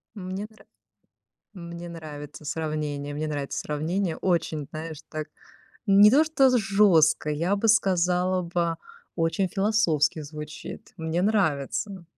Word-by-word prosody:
Мне 190 +1 -5
нра 220 - -20 0.9
мне 170 -1 -8
нравится 150 -3 -9
сравнение. 150 -2 -3
Мне 155 +1 -2
нравится 145 -2 -3
сравнение. 160 +4 -2
Очень, 165 -5 -1
знаешь, 155 -1 -6
так 155 0 -5 0.6
не 200 +1 +7
то, 290 +6 +5
что 275 -4 +4
з 250 - +3
жестко, 195 -8 +4
я 170 +7 0
бы 225 +3 0
сказала 185 -3 +2
бы 170 -1 -1 0.4
очень 165 +3 +1
философски 195 -7 +1
звучит. 150 0 -9
Мне 160 +2 -1
нравится. 190 -1 0
170 Hz, 125 wpm, -26 LUFS, 155-195 Hz, 0.9 s, не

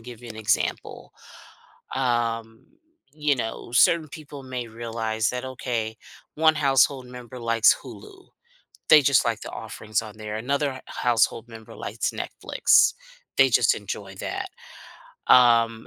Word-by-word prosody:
give 120 0 -11
you 120 - -9
an 110 - -9
example. 110 +1 -2 0.8
Um, 115 -3 -2 0.5
you 150 -1 0
know, 115 -1 -5
certain 155 +6 +4
people 145 -2 -10
may 130 -2 -5
realize 115 -1 -2
that, 125 0 -5
okay, 120 -4 -4 0.4
1 160 0 +4
household 135 -2 +2
member 125 0 -10
likes 115 -1 +4
Hulu; 390 -3 -13 0.6
they 155 - +9
just 135 -3 +4
like - - -1
the - - -8
offerings 110 +1 -4
on 110 -1 -11
there, 105 0 -5
another 140 +5 -1
h 130 - -9
household 115 -1 0
member 110 -1 -12
likes - - -3
Netflix; - - +2 0.4
they - - +6
just - - +4
enjoy - - -7
that. 385 - -4 0.8
Um, 115 -2 +5
120 Hz, 135 wpm, -24 LUFS, 115-135 Hz, 0.8 s, they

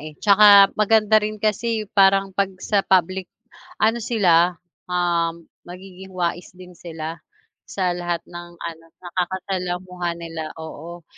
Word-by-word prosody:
eh, 155 0 -10
tsaka 200 0 +7
maganda 215 0 +4
rin 215 0 -4
kasi, 215 +1 -1
parang 195 0 +3
'pag 195 0 0
sa 200 +2 0
public, 185 -1 0 0.5
ano 225 +2 +1
sila, 180 -7 +2 0.3
um, 170 -2 -1 0.2
magiging 185 +1 -11
wais 175 0 -2
din 180 0 -13
sila 165 -1 -8 0.5
sa 185 -2 -1
lahat 175 -1 -4
ng 175 0 -10
ano, 165 -1 -8 0.2
nakakasalamuha 180 0 -3
nila, 165 -1 -7
oo, 165 +1 -9
180 Hz, 125 wpm, -21 LUFS, 170-200 Hz, 0.5 s, tsaka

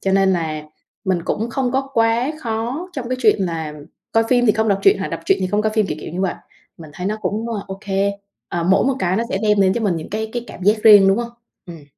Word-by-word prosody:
Cho 195 - 0
nên 195 0 +4
là 160 -4 -2 0.4
mình 185 -3 0
cũng 225 +3 -2
không 250 0 -1
có 270 +1 -1
quá 230 +4 +2
khó 240 +9 -3
trong 250 -4 -5
cái 255 - -1
chuyện 220 -4 +4
là 160 -3 -4 0.4
coi 225 0 +3
phim 245 0 +3
thì 215 - +5
không 220 0 0
đọc 195 - +2
truyện 395 +2 +5
hoặc - - -3
đọc - - -5
truyện 390 - +2
thì 185 - 0
không 205 +3 0
coi 215 - 0
phim, 215 -2 +2
kiểu, 150 - -3
kiểu - - -7
như 180 - -3
vậy, 190 -2 0 0.4
mình 160 -2 -12
thấy 180 +4 -4
nó 215 - -1
cũng 220 +3 -2 0.2
OK. 195 +1 -8 0.6
À, 170 -1 -2
mỗi 185 +3 +3
một 270 - +1
cái 185 -3 0
nó 225 - +1
sẽ 190 - -1
đem 210 -1 +3
đến 190 -1 +4
cho 235 - -1
mình 195 -6 0
những 160 - -7
cái 220 +1 -3
cái 240 -1 -4
cảm - - -11
giác 210 +2 +2
riêng, 205 -3 +8
đúng 195 +4 +3
hông? 235 0 -3 0.4
Ừm. 165 -4 -10
210 Hz, 270 wpm, -20 LUFS, 185-230 Hz, 0.6 s, riêng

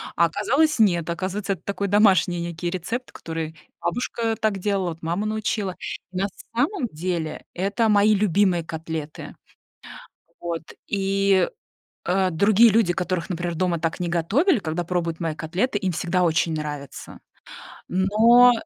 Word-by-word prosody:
а 170 - +5
оказалось- 260 - +1
нет. 175 -6 +3
Оказывается, 195 +3 -2
это 180 - -10
такой 200 0 -2
домашний 195 -3 +4
некий 170 0 -3
рецепт, 215 +8 -4
который 160 -1 -5 0.3
бабушка 230 -2 -1
так 215 -2 +1
делала, 195 -2 0
вот 165 0 -8
мама 170 +6 -2
научила. 215 -3 -2 0.4
И 185 - -6
на 195 +2 +1 0.3
самом 280 - 0
деле 160 -1 -3
это 200 +5 0
мои 210 +1 +5
любимые 195 -3 +2
котлеты. 160 -1 -6 1.1
Вот 170 -1 -3 0.2
и, 195 -2 +2 0.6
э, 185 +1 +1
другие 210 +7 +5
люди, 215 -4 +3
которых, 180 -2 -2
например, 175 -1 -3
дома 175 0 0
так 165 +1 -2
не 175 - -1
готовили, 220 - +2
когда 165 0 -3
пробуют 170 -2 -2
мои 165 -2 -1
котлеты, 180 +10 -1
им 190 -2 -1
всегда 175 +2 0
очень 165 -1 +2
нравится. 150 -3 -6 0.7
Но 225 +7 +6
185 Hz, 140 wpm, -23 LUFS, 170-210 Hz, 1.1 s, Но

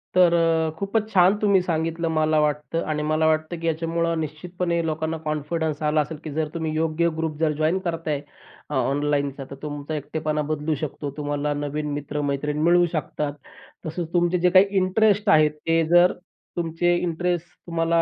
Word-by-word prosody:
तर 180 -2 +6
अ, 165 -1 +2
खूपच 210 +3 -1
छान 185 +1 +5
तुम्ही 200 -3 +4
सांगितलं, 165 -1 -1
मला 155 -1 +2
वाटतं 150 +2 0
आणि 150 -1 -1
मला 155 +1 +2
वाटतं, 155 +2 0
की 165 - -3
ह्याच्यामुळं 165 +1 0
निश्चितपणे 170 +3 -2
लोकांना 160 0 -2
कॉन्फिडन्स 155 0 -2
आला 155 0 +3
असेल, 150 +2 -5
की 155 - -6
जर 155 +1 0
तुम्ही 160 -2 -2
योग्य 165 +1 +1
ग्रुप 160 -2 -2
जर 160 -1 +2
जॉइन 155 +4 +2
करताय 165 -5 -2 0.5
अ, - - -5
ऑनलाईनचा, 140 +1 0
तर - - -6
तुमचा 145 0 -5
एकटेपणा 150 +1 -2
बदलू 155 0 -1
शकतो. 145 0 -4
तुम्हाला 145 0 -1
नवीन 145 +1 -3
मित्र-मैत्रिण 145 0 -2
मिळू 175 +1 +5
शकतात. 150 -1 -2 0.5
तसंच 160 +1 -4
तुमचे 175 0 +2
जे 180 +1 +4
काही 185 +2 +7
इंटरेस्ट 205 +2 +3
आहे, 155 -2 +6
ते 165 +2 0
जर 175 +1 +6 0.4
तुमचे 175 +1 +1
इंटरेस्ट 175 0 -1 0.2
तुम्हाला 165 0 +2
160 Hz, 165 wpm, -24 LUFS, 150-170 Hz, 0.5 s, काही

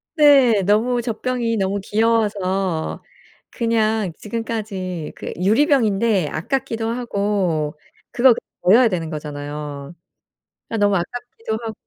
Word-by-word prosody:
네. 275 - +6
너무 220 +6 +2
젖병이 235 0 -2
너무 195 +1 0
귀여워서 200 -6 0 0.5
그냥 220 -4 0
지금까지 210 -7 -4
그 - - -6
유리병인데 215 - +2
아깝기도 225 +4 -2
하고 200 -10 -1 0.3
그거 250 +1 +5 0.3
버려야 230 +6 +6
되는 170 -4 -3
거잖아요. 145 0 -6 0.8
아 225 - -2
너무 205 -1 +3
아깝기도 225 +3 -5
하고 225 - -4
210 Hz, 255 characters per minute, -21 LUFS, 185-230 Hz, 0.8 s, 네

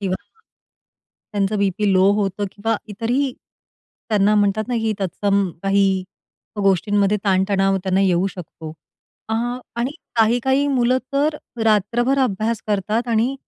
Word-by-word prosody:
किंवा 190 -2 -1 1.2
त्यांचा 205 0 0
BP 200 0 +1
low 190 +1 +5
होतं 195 0 -1
किंवा 225 +2 -1
इतरही 240 +6 -1 0.8
त्यांना 210 -1 +3
म्हणतात 210 +2 +1
ना, 245 - -1
की 225 -1 0
तत्सम 200 +1 0
काही 195 0 +3 0.8
गोष्टींमध्ये 200 +2 +2
ताण-तणाव 195 0 +2
त्यांना 190 0 +1
येऊ 185 -1 +2
शकतो. 160 -3 -9 0.6
अ, 220 - -1 0.4
आणि 240 +3 -1 0.3
काही-काही 245 +5 +2
मुलं 255 -1 +2
तर 300 +2 +1 0.3
रात्रभर 230 +5 +2
अभ्यास 220 +1 -2
करतात 215 +3 -1
आणि 235 +3 +1
205 Hz, 120 wpm, -21 LUFS, 195-230 Hz, 1.2 s, low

